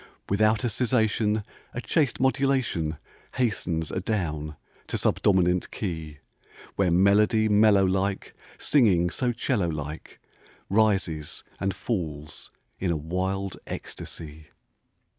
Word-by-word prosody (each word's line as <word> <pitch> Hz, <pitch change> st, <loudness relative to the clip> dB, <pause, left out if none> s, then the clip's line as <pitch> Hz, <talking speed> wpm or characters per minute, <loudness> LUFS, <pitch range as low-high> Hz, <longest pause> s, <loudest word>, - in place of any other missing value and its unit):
Without 110 Hz, +2 st, +3 dB
a 120 Hz, -, +1 dB
cessation 110 Hz, -3 st, +1 dB, 0.3 s
A -, -, -2 dB
chaste 130 Hz, +3 st, 0 dB
modulation 130 Hz, -, +1 dB, 0.4 s
Hastens 90 Hz, -, -1 dB
adown 80 Hz, -7 st, -2 dB, 0.3 s
to -, -, -2 dB
subdominant 90 Hz, -2 st, +2 dB
key, 80 Hz, -6 st, -5 dB, 0.6 s
Where 95 Hz, -2 st, +2 dB
melody 105 Hz, +5 st, +4 dB
mellow 105 Hz, -2 st, +5 dB
like 95 Hz, +1 st, -1 dB, 0.2 s
Singing 95 Hz, -, +3 dB
so 125 Hz, +4 st, 0 dB
'cello 105 Hz, -6 st, 0 dB
like 75 Hz, 0 st, -6 dB, 0.5 s
Rises 95 Hz, -8 st, +1 dB, 0.2 s
and 95 Hz, 0 st, -1 dB
falls 75 Hz, -9 st, -4 dB, 0.3 s
in 95 Hz, -, -1 dB
a 85 Hz, -, +1 dB
wild 95 Hz, +4 st, -2 dB
ecstasy. 75 Hz, -1 st, -7 dB
95 Hz, 105 wpm, -26 LUFS, 85-110 Hz, 0.6 s, mellow